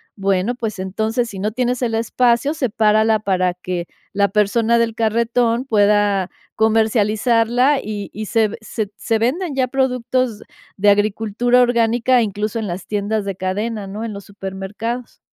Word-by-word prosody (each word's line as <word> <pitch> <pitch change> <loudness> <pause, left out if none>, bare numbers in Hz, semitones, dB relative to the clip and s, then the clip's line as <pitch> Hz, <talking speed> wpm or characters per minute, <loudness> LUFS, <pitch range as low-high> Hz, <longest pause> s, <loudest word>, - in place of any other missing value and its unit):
Bueno, 195 +3 0
pues 225 -5 -4
entonces, 220 +6 -1
si 195 - -8
no 210 +3 -1
tienes 250 +2 -1
el 235 -2 0
espacio, 240 +4 +1
sepárala 220 -5 +2
para 185 -3 0
que, 180 -1 -5 0.3
la 200 0 +2
persona 220 +3 +2
del 230 -1 0
carretón 230 +2 +1
pueda 205 -4 +2 0.3
comercializarla 225 +4 +2
y 205 -1 -5
y 215 +1 -5
se 220 -1 +2
se 215 -1 -4
se 225 0 -1
venden 290 +7 -1
ya 260 -1 +1
productos 255 -3 -1 0.4
de 205 +1 +4
agricultura 215 +4 +2
orgánica, 240 +1 +3
incluso 210 +1 -2
en 220 - -3
las 175 0 -6
tiendas 210 0 -1
de 195 -1 -3
cadena, 205 +3 -3
¿no?, 210 +4 -5
en 225 - -5
los 200 0 -8
supermercados. 200 +5 -6
220 Hz, 150 wpm, -19 LUFS, 205-235 Hz, 0.4 s, de